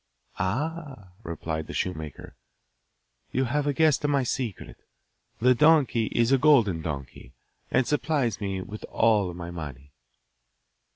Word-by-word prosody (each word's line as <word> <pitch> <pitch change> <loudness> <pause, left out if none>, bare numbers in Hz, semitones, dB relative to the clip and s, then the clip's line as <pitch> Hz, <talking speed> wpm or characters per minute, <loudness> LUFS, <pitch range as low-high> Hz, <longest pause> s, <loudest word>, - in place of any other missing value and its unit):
'Ah,' 135 - -3
replied 80 -4 -4
the - - -7
shoemaker, 80 -6 -4 1.0
'you 130 - +1
have 145 +3 0
guessed 155 -2 +3
my 140 -2 +2
secret. 120 -4 -4 0.6
The 125 +2 +5
donkey 135 -5 +4
is 120 +1 +1
a 135 - +5
golden 120 - +4
donkey, 70 -5 -7 0.4
and 130 - +2
supplies 145 -6 0
me 95 -2 -2
with 105 +3 -9
all 105 -5 +2
my 85 0 -7
money. 70 -4 -8
115 Hz, 120 wpm, -26 LUFS, 85-140 Hz, 1.0 s, The